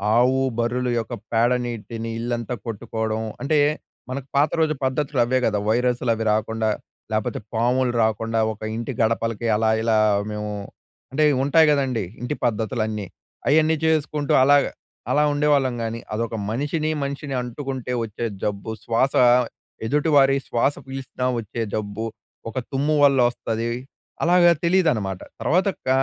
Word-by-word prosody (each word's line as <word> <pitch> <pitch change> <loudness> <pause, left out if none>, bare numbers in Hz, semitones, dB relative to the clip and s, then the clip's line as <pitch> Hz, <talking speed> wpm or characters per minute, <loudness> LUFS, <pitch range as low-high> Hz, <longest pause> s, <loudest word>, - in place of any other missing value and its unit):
ఆవు, 125 +2 +4 0.2
బర్రులు 125 +2 0
యొక్క 115 +2 -5 0.2
పేడ 115 +2 +3
నీటిని 115 -1 -5
ఇల్లంతా 120 +1 -2
కొట్టుకోడం. 110 0 -3 0.2
అంటే, 150 +2 +1 0.5
మనకు 130 +1 -5
పాత 145 +2 +4
రోజు 160 -1 +3
పద్ధతులు 135 +1 -1
అవే 130 +2 +1
గదా, 105 -2 +1
వైరస్లు 125 +1 +1
అవి 115 0 -3
రాకుండా, 110 +1 0 0.4
లేపోతే 110 -1 -1
పాములు 125 +2 +1
రాకుండా, 115 +1 0
ఒక 105 - -19
ఇంటి 120 +3 -4
గడపలకి 115 0 0
అలా 110 +1 +2
ఇలా 115 -1 +3 0.3
మేము 105 0 -4 0.6
అంటే, 155 +3 +2
ఇవుంటాయి 140 +5 +4
గదండీ, 130 -7 0 0.2
ఇంటి 125 +4 -2
పద్ధతులన్నీ. 110 -2 -1 0.4
అయన్నీ 155 +2 +4
చేసుకుంటూ 150 -2 +1
అలాగా 145 +1 +5 0.4
అలా 150 - +4
ఉండేవాళ్ళం 145 -3 +2
గానీ. 115 +1 -3
అదొక 115 +1 -2 0.2
మనిషిని, 150 +6 -1
మనిషిని 140 0 -4
అంటుకుంటే 130 0 -5
ఒచ్చే 115 +1 -4 0.2
జబ్బు, 105 +2 -2
శ్వాస 125 +4 +1 0.7
ఎదుటి 150 +5 +1
వారి 135 0 +5
శ్వాస 120 +4 +1
పీల్చినా 135 -1 -5 0.2
ఒచ్చే 115 +2 -5
జబ్బు, 110 +1 -3 0.5
ఒక - - -22 0.2
తుమ్ము 145 +3 +1
వల్లొస్తది, 120 -4 +2 0.5
అలాగా 175 0 +6
తెలీదనమాట. 155 - +1 0.2
తర్వాత, 175 +11 +2 0.2
క - - +2
125 Hz, 130 wpm, -23 LUFS, 115-140 Hz, 0.7 s, అలాగా